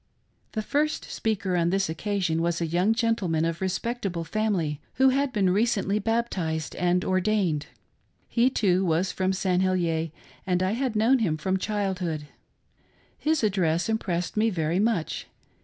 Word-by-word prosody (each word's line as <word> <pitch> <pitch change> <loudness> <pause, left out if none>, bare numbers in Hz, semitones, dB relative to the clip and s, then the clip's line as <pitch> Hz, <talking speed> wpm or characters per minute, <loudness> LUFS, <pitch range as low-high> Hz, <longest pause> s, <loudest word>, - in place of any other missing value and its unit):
The 215 - -2
first 300 +7 -1
speaker 200 -4 -1
on 170 -1 +2
this 195 +1 +1
occasion 170 0 -1
was 170 0 0
a 170 - 0
young 175 +6 +2
gentleman 225 -9 +1
of 165 +1 -2
respectable 190 -2 -2
family, 165 -5 -1
who 265 0 +5
had 275 +1 +1
been 195 -6 +2
recently 210 -1 +1
baptized 195 -9 -1
and 180 0 +1
ordained. 185 -5 +1 0.6
He, 240 +2 +3
too, 190 -7 +2
was 175 +1 +1
from 185 0 0
St. 185 -1 +1
Heliers, 170 -4 +1 0.4
and 180 0 +1
I 185 - +1
had 245 0 -1
known 235 +5 +4
him 170 -9 0
from 190 +5 0
childhood. 190 -7 -2 0.9
His 310 -3 +1
address 175 -3 +1
impressed 180 -6 -1
me 220 +1 +3
very 165 -2 0
much. 210 -6 0
190 Hz, 150 wpm, -26 LUFS, 170-220 Hz, 0.9 s, who